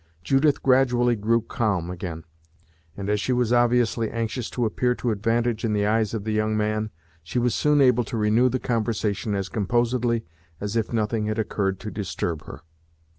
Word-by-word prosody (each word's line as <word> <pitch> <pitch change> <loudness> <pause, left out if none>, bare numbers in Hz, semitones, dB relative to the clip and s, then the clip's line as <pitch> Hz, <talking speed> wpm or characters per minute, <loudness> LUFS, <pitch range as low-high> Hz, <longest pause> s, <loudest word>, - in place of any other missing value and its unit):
Judith 135 - +2
gradually 125 -2 +3
grew 115 +2 +1
calm 105 -7 -1
again, 85 -3 -6 0.7
and 100 0 -5
as 105 0 +1
she 130 - -1
was 125 -1 +1
obviously 120 -2 +2
anxious 115 +1 -3
to 120 - -1
appear 125 +3 0
to 120 - -1
advantage 115 +2 0
in 110 -2 0
the 105 -1 +1
eyes 110 0 +1
of 105 - -3
the 110 - -2
young 110 0 +1
man, 110 0 -1 0.3
she 85 +7 -5
was 120 -1 +2
soon 150 -1 +3
able 125 -2 +4
to 115 - -4
renew 110 +4 +3
the 130 - 0
conversation 110 -4 -1
as 95 -1 -2
composedly 120 +3 0 0.3
as 105 +2 -4
if 115 -2 0
nothing 110 -1 0
had 110 +1 -2
occurred 100 -3 -1
to 105 - -5
disturb 85 -5 -3
her. 65 - -10
110 Hz, 180 wpm, -24 LUFS, 105-120 Hz, 0.7 s, able